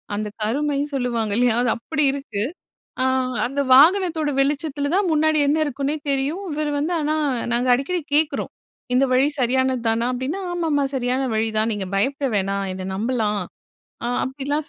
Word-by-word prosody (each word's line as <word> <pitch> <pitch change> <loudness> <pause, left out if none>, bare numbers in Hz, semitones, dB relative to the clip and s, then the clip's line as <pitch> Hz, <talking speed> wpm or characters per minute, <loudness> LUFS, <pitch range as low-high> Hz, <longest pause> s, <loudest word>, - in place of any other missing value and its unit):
அந்த 210 +1 -2 0.2
கருமைன்னு 285 +5 0
சொல்லுவாங்க 235 -4 -1
இல்லையா? 245 -2 +3
அது 245 - +2
அப்பிடி 300 +5 -1
இருக்கு. 230 -7 -3 0.6
அ - - +2 0.4
அந்த 275 +3 -1
வாகனத்தோட 320 +1 +5
வெளிச்சத்துல 285 0 -1
தான் 395 0 +2
முன்னாடி 310 0 +3
என்ன 295 +2 +2
இருக்குன்னே 280 +1 -2 0.2
தெரியும். 280 +8 -1
இவர் 300 0 -1
வந்து 315 +5 -1
ஆனா 305 +1 0 0.4
நாங்க 245 +2 +1
அடிக்கடி 340 +8 -2
கேக்குறோம் 305 0 0 0.4
இந்த 260 +2 +4
வழி 260 +3 +4
சரியானது 260 +1 +1
தானா? 225 +1 0
அப்டின்னா, 260 +9 -3
ஆமாம்மா 320 -5 0
சரியான 255 +1 0
வழிதான். 220 0 +1
நீங்க 205 -3 -3
பயப்பட 275 +8 0
வேணாம் 195 0 -1
என்ன 185 0 -6
நம்பலாம் 215 -1 0 0.7
அ - - -1 0.2
அப்படிலாம் 285 +3 -3
270 Hz, 150 wpm, -22 LUFS, 235-300 Hz, 0.7 s, வாகனத்தோட